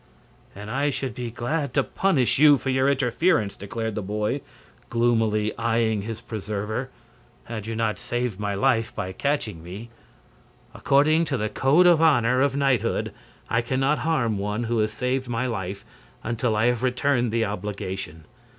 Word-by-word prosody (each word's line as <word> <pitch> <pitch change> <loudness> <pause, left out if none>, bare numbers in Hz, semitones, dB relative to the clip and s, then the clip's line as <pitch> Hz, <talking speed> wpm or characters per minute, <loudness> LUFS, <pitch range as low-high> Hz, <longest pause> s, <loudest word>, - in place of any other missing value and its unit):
"And 105 +2 -8
I 140 +3 +1
should 135 -3 -3
be 120 -1 -5
glad 135 +4 -3
to 140 - +4
punish 140 -10 +1
you 150 -1 +7
for 135 - -2
your 130 +1 +2
interference," 125 - +1
declared 110 +2 -4
the 105 - -3
boy, 105 +7 -2 0.5
gloomily 110 -3 +1
eying 115 -2 +1
his 110 +2 -6
preserver, 110 +2 -4 0.5
"had 110 -2 -6
you 115 - -3
not 110 -1 -1
saved 120 -4 -3
my 100 -1 -2
life 115 0 +1
by 95 - -3
catching 110 - -2
me. 100 +7 -9 0.8
According 155 +4 +3
to 140 -4 -1
the 110 -1 -1
code 140 +11 +3
of 170 -3 +6
honor 130 -6 +4
of 140 -1 +2
knighthood 135 -5 +1 0.3
I 115 - +1
can 130 +2 -2
not 145 +3 +2
harm 120 -10 0
one 105 +3 -2
who 115 0 0
has 110 0 +1
saved 125 +2 -2
my 120 +2 -1
life 100 -4 -4 0.4
until 115 -1 -1
I 110 +2 +2
have 120 -1 +1
returned 125 -1 +1
the 115 0 +1
obligation. 95 -6 -5
115 Hz, 165 wpm, -24 LUFS, 105-135 Hz, 0.8 s, you